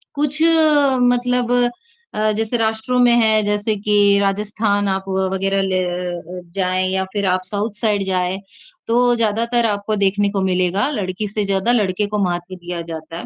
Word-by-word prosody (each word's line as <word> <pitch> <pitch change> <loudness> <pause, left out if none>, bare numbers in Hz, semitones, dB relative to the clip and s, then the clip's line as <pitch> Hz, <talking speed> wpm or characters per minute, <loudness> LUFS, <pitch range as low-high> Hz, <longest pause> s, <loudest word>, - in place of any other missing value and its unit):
कुछ 295 +1 -1 0.6
मतलब 245 0 +1 0.6
अ, 215 0 +1
जैसे 220 +3 -1
राष्ट्रों 225 +2 0
में 245 -1 +5
हैं, 220 -2 +3
जैसे 210 +1 0
कि 205 -1 +3
राजस्थान 205 +1 0
आप 190 0 -2
वग़ैरह 190 +1 0
ल 190 - -2
अ, 180 -1 -3
जाएँ 185 -1 0
या 190 0 0
फ़िर 200 -1 -1
आप 185 0 +1
साउथ 205 +3 -1
साइड 210 -3 +1
जाएँ, 185 0 -1 0.5
तो 245 +1 +3
ज़्यादातर 230 +1 0
आपको 205 0 -2
देखने 200 +1 +1
को 200 -1 -1
मिलेगा 185 +4 +1
लड़की 205 -4 -3
से 210 +1 -2
ज़्यादा 195 +3 +1
लड़के 205 -3 +1
को 210 0 -3
महत्व 175 +1 -4
दिया 175 -1 -6
जाता 165 0 -8
है - - -7
200 Hz, 165 wpm, -19 LUFS, 185-220 Hz, 0.6 s, में